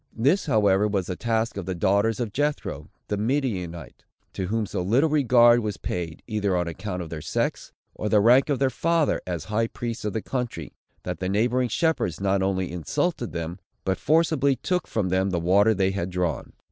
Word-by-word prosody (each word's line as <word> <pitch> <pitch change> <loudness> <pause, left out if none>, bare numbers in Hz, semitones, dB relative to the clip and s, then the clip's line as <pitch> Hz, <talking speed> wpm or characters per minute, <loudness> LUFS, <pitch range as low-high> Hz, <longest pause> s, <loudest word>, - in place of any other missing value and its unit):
This, 145 - +2
however, 105 -5 +3
was 100 -3 -1
the 90 - -4
task 115 +1 -1
of 95 -2 -5
the 95 - -2
daughters 100 +5 +1
of 115 -4 -3
Jethro 145 +3 -2 0.2
the 105 - -1
Midianite; 100 - -2 0.3
to 95 - -3
whom 110 +2 0
so 100 -2 -3
little 125 - +2
regard 120 -5 +5
was 105 -3 -3
paid, 85 -3 -5
either 105 -4 0
on 90 -1 -1
account 90 +1 -4
of 80 - -10
their 80 -2 -5
sex, - - -2 0.2
or 105 - -3
the 105 - +4
rank 125 +7 +5
of 140 - +1
their 135 0 +1
father, 165 +3 +1
as 85 -4 -3
high 110 +2 0
priest 115 0 -5
of 105 - -2
the 110 - -3
country, 125 -3 -4 0.3
that - - -4
the 95 - -2
neighboring 120 +5 +1
shepherds 160 - 0
not 100 0 +1
only 95 -2 -1
insulted 120 - -2
them, 85 +2 -5 0.3
but 95 -1 0
forcibly 155 -3 +2
took 180 +8 -2
from 105 -5 -1
them 95 +2 +1
the 90 -2 -1
water 100 +6 +4
they 95 0 +1
had 95 -2 -3
drawn. 90 -4 -2
105 Hz, 195 wpm, -25 LUFS, 95-125 Hz, 0.3 s, regard